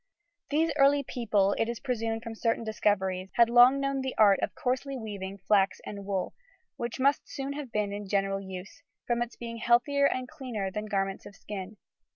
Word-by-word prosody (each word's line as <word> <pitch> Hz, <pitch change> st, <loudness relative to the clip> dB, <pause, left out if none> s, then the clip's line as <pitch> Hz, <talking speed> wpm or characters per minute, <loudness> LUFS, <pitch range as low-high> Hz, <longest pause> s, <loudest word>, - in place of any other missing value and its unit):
These 315 Hz, +3 st, +2 dB
early 280 Hz, 0 st, +5 dB
people, 210 Hz, -6 st, +1 dB
it 225 Hz, -, +1 dB
is 235 Hz, -, -4 dB
presumed 225 Hz, -3 st, -2 dB
from 230 Hz, -1 st, -6 dB
certain 230 Hz, +1 st, 0 dB
discoveries, 190 Hz, -4 st, 0 dB
had 235 Hz, -1 st, +5 dB
long 245 Hz, +3 st, +7 dB
known 275 Hz, -1 st, -1 dB
the 265 Hz, 0 st, -3 dB
art 205 Hz, -3 st, +6 dB
of -, -, -2 dB
coarsely 260 Hz, +2 st, -2 dB
weaving 200 Hz, -4 st, -6 dB
flax 195 Hz, 0 st, +2 dB
and 200 Hz, -1 st, -7 dB
wool, 190 Hz, -2 st, -2 dB, 0.4 s
which 235 Hz, +2 st, -4 dB
must 280 Hz, +2 st, +2 dB
soon 275 Hz, 0 st, -4 dB
have 285 Hz, -4 st, -6 dB
been 210 Hz, -2 st, -1 dB
in 205 Hz, 0 st, -5 dB
general 195 Hz, 0 st, 0 dB
use, 190 Hz, 0 st, -9 dB, 0.2 s
from 240 Hz, 0 st, 0 dB
its 240 Hz, 0 st, -3 dB
being 230 Hz, -1 st, -7 dB
healthier 245 Hz, +5 st, +3 dB
and 255 Hz, -2 st, -2 dB
cleaner 245 Hz, -11 st, -4 dB
than 210 Hz, +2 st, -4 dB
the -, -, -10 dB
garments 195 Hz, -1 st, -2 dB
of 200 Hz, -, -13 dB
skin. 205 Hz, 0 st, -7 dB
225 Hz, 190 wpm, -29 LUFS, 200-255 Hz, 0.4 s, long